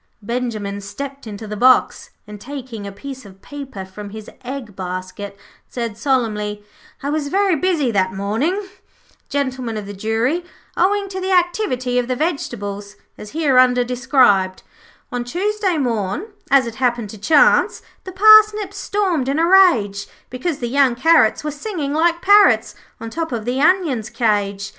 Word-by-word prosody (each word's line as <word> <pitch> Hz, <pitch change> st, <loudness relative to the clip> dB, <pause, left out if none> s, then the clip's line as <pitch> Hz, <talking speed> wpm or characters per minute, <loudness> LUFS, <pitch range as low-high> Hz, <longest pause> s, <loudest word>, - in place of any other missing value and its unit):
Benjimen 215 Hz, -4 st, -3 dB
stepped 275 Hz, +6 st, -8 dB
into 215 Hz, +1 st, -7 dB
the 210 Hz, 0 st, -6 dB
box, 255 Hz, +4 st, +3 dB, 0.2 s
and, 210 Hz, -1 st, -11 dB
taking 250 Hz, -5 st, -7 dB
a -, -, -6 dB
piece 265 Hz, +6 st, -9 dB
of 195 Hz, -2 st, -15 dB
paper 270 Hz, -6 st, -8 dB
from 200 Hz, +2 st, -9 dB
his 215 Hz, +1 st, -10 dB
egg 250 Hz, -5 st, -7 dB
basket, 185 Hz, +2 st, -6 dB, 0.3 s
said 235 Hz, -4 st, -4 dB
solemnly: 210 Hz, -5 st, -1 dB, 0.4 s
'I 285 Hz, -, -2 dB
was 300 Hz, -1 st, -1 dB
very 390 Hz, +3 st, +2 dB
busy 315 Hz, -6 st, 0 dB
that 190 Hz, -3 st, +1 dB
morning, 230 Hz, -, -2 dB, 0.6 s
Gentlemen 260 Hz, -5 st, -2 dB
of 210 Hz, -, -5 dB
the 205 Hz, -, -7 dB
Jury, 225 Hz, -, -1 dB, 0.3 s
owing 400 Hz, +1 st, +1 dB
to 375 Hz, 0 st, -5 dB
the 380 Hz, +1 st, -2 dB
activity 350 Hz, -, +1 dB
of 245 Hz, -, -2 dB
the 255 Hz, -, -1 dB
vegetables, 205 Hz, -, -4 dB, 0.2 s
as 210 Hz, -, -11 dB
hereunder 255 Hz, -5 st, +3 dB
described 245 Hz, -7 st, +2 dB, 0.5 s
'On 245 Hz, -1 st, -2 dB
Tuesday 380 Hz, -, -1 dB
morn, 245 Hz, -, -2 dB, 0.2 s
as 275 Hz, -2 st, +5 dB
it 235 Hz, -, -5 dB
happened 240 Hz, -4 st, 0 dB
by 215 Hz, -, -11 dB
chance, 325 Hz, -, +3 dB, 0.2 s
The 375 Hz, -, -8 dB
parsnips 425 Hz, 0 st, +5 dB
stormed 370 Hz, -10 st, -1 dB
in 280 Hz, -, 0 dB
a 330 Hz, -, +3 dB
rage, 245 Hz, -, +4 dB, 0.2 s
Because 270 Hz, +5 st, -3 dB
the 240 Hz, -, -4 dB
young 265 Hz, -1 st, +2 dB
carrots 270 Hz, -3 st, +3 dB
were 300 Hz, -, -2 dB
singing 295 Hz, -2 st, -4 dB
like 340 Hz, +2 st, +1 dB
parrots 395 Hz, -, +5 dB, 0.3 s
On 225 Hz, 0 st, -7 dB
top 325 Hz, +1 st, -4 dB
of 225 Hz, -3 st, -4 dB
the 250 Hz, +3 st, -1 dB
onions' 310 Hz, -, +2 dB
cage. 205 Hz, -3 st, -1 dB
255 Hz, 155 wpm, -19 LUFS, 210-325 Hz, 0.6 s, as